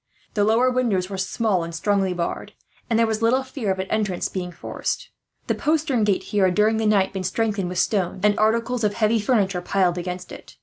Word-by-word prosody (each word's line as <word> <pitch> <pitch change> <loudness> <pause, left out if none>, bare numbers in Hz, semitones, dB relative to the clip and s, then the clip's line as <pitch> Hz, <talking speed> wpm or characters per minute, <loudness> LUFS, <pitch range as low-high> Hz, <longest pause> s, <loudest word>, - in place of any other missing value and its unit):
The 205 - +2
lower 230 +4 +3
windows 210 -7 0
were 195 - -4
small 190 -1 0
and 165 0 -6
strongly 195 +2 +1
barred, 175 -1 -4 0.4
and 230 - +2
there 230 - +4
was 220 0 -2
little 250 +4 +3
fear 260 -5 -4
of 190 - -1
an 190 - -2
entrance 210 -5 -1
being 180 -2 -4
forced. - - -4 0.3
The - - 0
postern 295 -7 +1
gate 200 -2 +1
here 205 -2 +1
had, 180 -1 +1
during 215 +1 +3
the 220 -1 +1
night, 195 -3 +2
been 190 -1 -3
strengthened 200 -1 -1
with 180 - -5
stones; 190 -3 0
and 210 0 +4
articles 230 +2 +1
of 205 -1 +1
heavy 225 0 +2
furniture 200 -5 +1
piled 180 -1 +1
against 180 0 -6
it. - - -12
205 Hz, 215 wpm, -23 LUFS, 185-225 Hz, 0.4 s, there